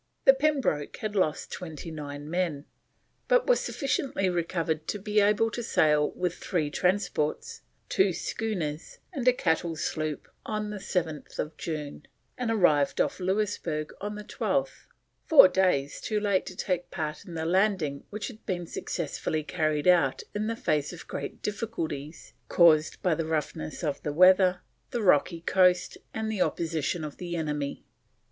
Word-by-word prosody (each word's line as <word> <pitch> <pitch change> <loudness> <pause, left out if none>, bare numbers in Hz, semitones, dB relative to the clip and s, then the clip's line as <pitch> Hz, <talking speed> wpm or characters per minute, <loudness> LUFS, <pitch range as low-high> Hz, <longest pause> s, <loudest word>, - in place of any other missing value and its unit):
The 270 - +9
Pembroke 270 - 0
had 215 -1 -4
lost 170 -6 0
29 150 -4 -7
men, 165 -4 -1 0.6
but - - +4
was - - +4
sufficiently 265 -8 -1
recovered 165 -2 -1
to - - -1
be 210 +1 +1
able 210 +2 +3
to 240 - -4
sail 150 -9 +3
with 180 -1 -1
3 155 -5 -1
transports, 180 - -1 0.3
2 190 0 +3
schooners, 170 -6 -3 0.2
and 260 -5 -3
a - - +9
cattle 165 -7 0
sloop 155 -1 -3 0.2
on 215 -1 -3
7th 160 -6 -3
June, 150 -3 -5 0.3
and 250 -2 -2
arrived 165 -10 +3
off - - +1
Louisburg 185 -5 -1
on 210 +1 -4
the 210 - -7
12th, - - -2 0.4
four 300 -11 +9
days 180 -7 +1
too 215 -1 -1
late 200 -3 +1
to 185 - -7
take 180 -1 -2
part 155 0 -4
in 175 -5 -9
the 160 0 -2
landing 180 -6 +1
which 210 0 -4
had 225 -4 -11
been 175 -2 -2
successfully 155 -1 -3
carried 155 -1 0
out 170 -7 +4
in 210 +1 -1
the 230 - -1
face 150 -8 0
of 175 - -10
great - - -6
difficulties 165 -9 -4 0.2
caused 155 -3 +5
by 180 - +3
the 160 0 -2
roughness 160 +1 -3
of 145 -3 -2
the 150 - -2
weather, 185 +2 +5 0.3
the 240 -3 -2
rocky 165 -1 +3
coast, 180 0 +3
and 220 0 -3
the 210 -4 -2
opposition 165 -1 -1
of 150 -2 -6
the 175 -1 -5
enemy. 150 -3 -3
175 Hz, 155 wpm, -28 LUFS, 155-205 Hz, 0.6 s, The